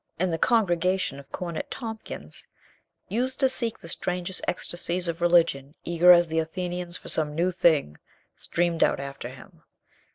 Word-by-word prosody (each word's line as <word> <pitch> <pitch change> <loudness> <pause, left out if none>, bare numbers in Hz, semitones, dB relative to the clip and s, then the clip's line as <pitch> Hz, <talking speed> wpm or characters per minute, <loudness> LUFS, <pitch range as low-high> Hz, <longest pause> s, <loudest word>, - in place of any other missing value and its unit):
And 180 0 0
the 165 - -2
congregation 185 - +1
of 140 - -15
Cornet 170 -3 -5
Tompkins, 220 - -5 0.6
used 250 +6 -2
to 270 - +5
seek 235 -3 +3
the - - -12
strangest 180 +1 -3
ecstasies 175 0 -1
of 170 0 -3
religion, 165 -5 +3
eager 175 +1 +5
as 175 -1 +7
the 160 0 0
Athenians 175 +2 -4
for - - -13
some 150 -2 -1
new 175 +3 +1
thing, 155 - +2 0.4
streamed 170 -1 -1
out - - +2
after 140 -3 -6
him. 130 -1 -14
175 Hz, 155 wpm, -26 LUFS, 160-185 Hz, 0.6 s, as